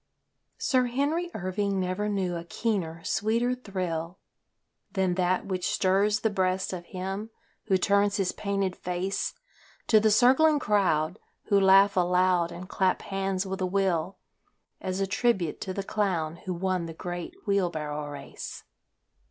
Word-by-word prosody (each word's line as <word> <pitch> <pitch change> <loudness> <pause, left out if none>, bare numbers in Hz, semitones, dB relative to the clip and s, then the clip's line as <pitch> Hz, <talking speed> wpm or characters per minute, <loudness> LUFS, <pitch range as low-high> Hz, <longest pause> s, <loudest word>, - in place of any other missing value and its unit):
Sir 255 -3 +2
Henry 290 +8 0
Irving 195 +1 -1
never 185 +3 -1
knew 190 -3 -1
a 170 - -4
keener, 170 -4 -2
sweeter 230 +4 +1
thrill 185 -7 -4 0.8
Than 190 -2 +1
that 180 0 +1
which 185 -2 -2
stirs 200 +3 +2
the 220 - +1
breast 185 -1 0
of 175 -1 -6
him 195 +4 -5 0.4
who 195 -3 +3
turns 200 +2 +2
his 195 -3 +1
painted 195 -2 -2
face 180 +2 -2 0.5
To 220 - +5
the 220 +1 +3
circling 260 +8 +5
crowd 190 - +1 0.3
who 200 - +5
laugh 195 +1 +6
aloud 180 -1 +3
and 180 +2 -8
clap 190 -1 +1
hands 195 -1 -2
with 190 0 -4
a 185 - +1
will 185 -2 0 0.6
As 185 0 -3
a - - +2
tribute 195 -4 0
to 190 - -3
the 195 +1 -3
clown 175 -6 -1
who 185 - 0
won 185 -1 -1
the 165 - -8
great 175 - -5
wheel 200 -4 +2
barrow 150 -2 -4
race. 145 -1 -8
190 Hz, 150 wpm, -27 LUFS, 180-205 Hz, 0.8 s, laugh